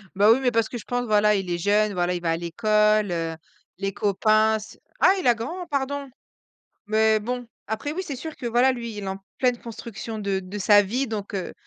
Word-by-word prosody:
Bah, 205 +2 +5
oui 235 - +5
mais 250 -2 +2
parce 230 -1 +2
que 245 - -6
je 230 - -9
pense, 245 0 -2
voilà 210 -1 +4
il 190 -2 -2
est 175 - 0
jeune, 205 +3 +2
voilà 180 -1 0
il 175 - -3
va 165 -1 0
à 165 - 0
l'école, 210 +3 +2
heu, 165 -1 -2 0.4
les 195 +1 -3
copains 215 +2 +3
s 215 +1 -11 0.2
Ah 375 - +6
il - - -5
a 240 - +5
grand 330 +11 -5
pardon. 280 -1 -2 0.8
Mais 220 0 +3
bon, 245 +3 -4 0.2
après 220 +7 -3
oui 370 +4 -3
c'est 290 -7 -5
sûr 315 +4 -7
que 255 - -7
voilà, 245 +3 +3
lui 235 -2 -5
il 205 - -5
est - - -5
en 190 0 -4 0.2
pleine 250 -2 +1
construction 225 -1 -7
de 200 -2 -1
de 190 +2 -7
sa 205 +1 +6
vie 240 +7 -1
donc, 210 -3 -5
heu. 190 -2 -3
215 Hz, 230 wpm, -24 LUFS, 200-245 Hz, 0.8 s, Ah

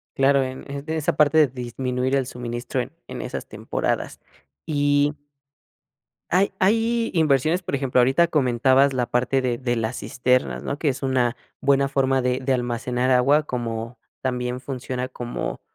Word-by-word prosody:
Claro, 135 0 +4
en 130 +2 -7
en 140 0 -5
esa 160 -1 0
parte 150 +1 +4
de 155 -2 +6
disminuir 125 +1 -2
el 135 -1 +1
suministro 120 +1 -4
en 120 - -7 0.2
en - - -6
esas - - -5
temporadas, - - -3 0.5
y 145 -1 +2 1.2
hay 190 +2 +2
hay 230 +4 +2
inversiones, 155 +1 +2
por 170 - -3
ejemplo, 130 -2 +1
ahorita 135 +8 +4
comentabas 135 -2 +3
la 125 -2 0
parte 125 +3 +1
de 125 -2 -1
de 120 -1 -1
las 115 +1 -2
cisternas, 125 +4 0
¿no? 140 - -3
Que 155 - -1
es 135 0 -4
una 130 -2 +1 0.2
buena 140 0 +3
forma 135 -1 +2
de 125 0 0
de 135 0 0
almacenar 125 +1 -1
agua, 135 +4 +4
como 115 -3 -4 0.2
también 125 -1 -2
funciona 130 -1 -4
como 120 -1 -5
130 Hz, 155 wpm, -23 LUFS, 125-140 Hz, 1.2 s, de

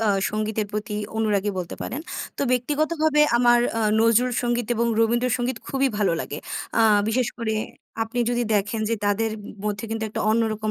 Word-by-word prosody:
আ - - +3 0.2
সঙ্গীতের 215 0 -1
প্রতি 210 +1 -3 0.2
অনুরাগী 210 -2 +1
বলতে 175 -2 -4
পারেন। 270 - -4 0.4
তো - - -1
ব্যক্তিগতভাবে 300 +4 +1 0.2
আমার 240 0 +5 0.2
আ - - 0 0.2
নজরুল 230 +2 +4
সঙ্গীত 240 -1 0
এবং 235 +1 +1
রবীন্দ্র 235 +2 +2
সঙ্গীত 245 -1 -2
খুবই 270 0 +1
ভালো 200 -5 +2
লাগে। 145 - -5 0.4
আ 230 - +4 0.3
বিশেষ 240 +1 +1
করে 230 -2 -1 0.5
আপনি 225 +2 -4
যদি 240 0 +1
দেখেন 210 +2 0
যে - - +3
তাদের 210 +2 +1 0.3
মধ্যে 210 0 -2
কিন্তু 225 0 -2
একটা - - -4
অন্যরকম 215 -1 0
225 Hz, 170 wpm, -24 LUFS, 215-245 Hz, 0.5 s, আমার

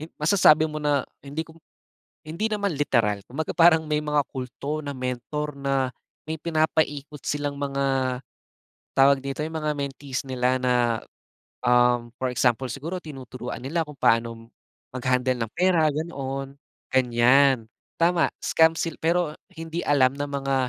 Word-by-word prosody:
hin 155 - -7
masasabi 155 -1 +5
mo 155 - -5
na 145 -1 +2 0.2
hindi 140 +3 -4
ko 160 - -16 0.7
hindi 170 +8 -1
naman 200 -5 -1
literal 115 -8 +1
kumbaga 155 +5 -3
parang 165 -2 +5
may 150 0 +1
mga 150 0 +1
kulto 140 +4 -5
na 145 - -4
mentor 130 +4 -3
na 135 -1 0 0.4
may 160 - -2
pinapaikot 155 -3 -1
silang 145 -1 -2
mga, 135 -2 0 0.8
tawag 140 +1 +6
dito, 140 +2 -4
'yong 160 - -6
mga 155 -1 -1
mentees 140 -1 -4
nila 130 0 +1
na, 125 -1 +2 0.9
um, 120 -1 +3
for 130 - 0
example 125 +1 +1
siguro 165 +8 -5
tinuturuan 130 -4 -7
nila 165 +5 0
kung 150 - -10
paanong, 115 0 +1 0.5
mag-handle 125 -1 +1
ng - - -22
pera 180 -4 +3
ganoon, 135 -3 -4 0.4
ganiyan. 125 0 +4 0.3
Tama, 170 0 +3 0.2
scam 160 0 +4
sil 165 -2 -2
pero, 170 0 +1 0.2
hindi 165 +1 -5
alam 135 -3 +4
ng 145 0 -3
mga 135 -1 -1
140 Hz, 140 wpm, -25 LUFS, 130-155 Hz, 0.9 s, tawag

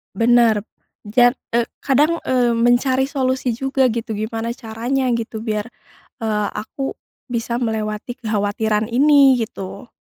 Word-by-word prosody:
Bener 230 -1 +4 0.4
ja 245 +3 +4 0.2
eee, 235 0 +2 0.2
kadang, 295 +5 +2
eee, 245 -2 +2
mencari 250 +3 +2
solusi 260 -2 -1
juga 265 +2 +1
gitu 225 -1 -3
gimana 225 +2 -3
caranya 245 +3 -2
gitu 225 -1 -3
biar, 215 -2 -2 0.6
eee, 210 -2 0
aku 270 +5 -4 0.3
bisa 235 -1 -2
melewati 220 -1 -3
kekhawatiran 215 0 0
ini 280 +1 +6
gitu. 200 0 -7
235 Hz, 120 wpm, -20 LUFS, 220-260 Hz, 0.6 s, ini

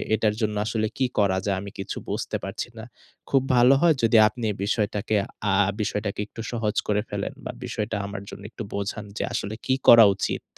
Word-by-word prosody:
এটার 105 -1 +1
জন্য 105 -1 0
আসলে 110 -1 0
কি 130 - +2
করা 95 -2 +3
যায়? 100 -2 0
আমি 100 -1 -8
কিছু 95 - -4
বুঝতে - - -2
পারছি - - -5
না। - - -7 0.5
খুব 135 - +4
ভালো 125 +2 +6
হয় 170 -3 +5
যদি 115 0 +5
আপনি 120 +2 -6
এই 100 - -7
বিষয়টাকে 105 0 0 0.4
আ - - +4 0.3
বিষয়টাকে 105 -1 -2
একটু 115 - -9
সহজ 110 -3 -1
করে 105 0 +2
ফেলেন - - -3
বা, - - -3
বিষয়টা 105 +1 -3
আমার 100 0 -6
জন্য - - -10
একটু 115 - -7
বোঝান 100 +1 -3
যে, - - -1
আসলে 105 +2 -3
কি 130 - +2
করা 115 -1 +10
উচিত? 95 - -2
105 Hz, 200 wpm, -25 LUFS, 100-115 Hz, 0.5 s, করা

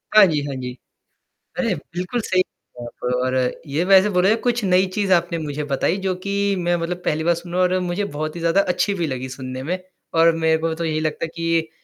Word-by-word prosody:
हाँ 215 - +10
जी, 150 -3 0
हाँ 140 -2 -4
जी। 125 0 -4 0.9
अरे! 230 -6 +1
बिल्कुल 180 +9 -4
सही 185 -2 +2 0.4
बात 120 0 -10 0.2
और 130 0 0 0.3
ये 150 +5 0
वैसे 195 +1 +6
बोले 180 0 +3
जाए 220 - +4
कुछ 240 -2 0
नई 185 +1 +4
चीज़ 200 -2 0
आपने 170 -1 +1
मुझे 150 -1 -4
बताई 145 +5 0
जो 185 - +1
कि 200 0 0
मैं 175 0 +1
मतलब 170 +1 -3
पहली 155 +1 0
बार 170 +1 +3
सुन 170 +1 -9
रहा 185 - +2
हूँ 180 - +5
और - - 0
मुझे 180 +3 -1
बहुत 155 -2 -4
ही - - -5
ज़्यादा 170 +4 +3
अच्छी 200 +2 0
भी 170 -4 -1
लगी 130 -1 -4
सुनने 130 0 -6
में 180 +5 -1 0.4
और 165 0 +7
मेरे 160 0 +2
को 165 0 0
तो 165 0 -3
यही 155 -1 0
लगता 155 +1 -2
है 160 - -7
कि 165 -1 0
170 Hz, 235 wpm, -21 LUFS, 155-185 Hz, 0.9 s, हाँ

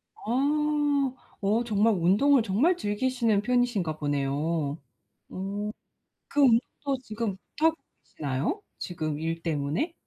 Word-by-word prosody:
아. 290 +2 +1 0.3
어 215 +4 +2
정말 220 0 +3
운동을 205 +10 +4
정말 235 - +2
즐기시는 230 - +1
편이신가 240 -9 +1
보네요. 145 +1 -1 0.5
어. 200 +3 -4 0.6
그 290 - 0
운동도 265 +2 +2
지금 215 -4 -3 0.2
못하고 320 +1 +3 0.3
계시나요, 145 - -3 0.2
지금 155 -4 -3
일 165 +1 -3
때문에? 160 - -1
210 Hz, 240 characters per minute, -27 LUFS, 165-265 Hz, 0.6 s, 운동을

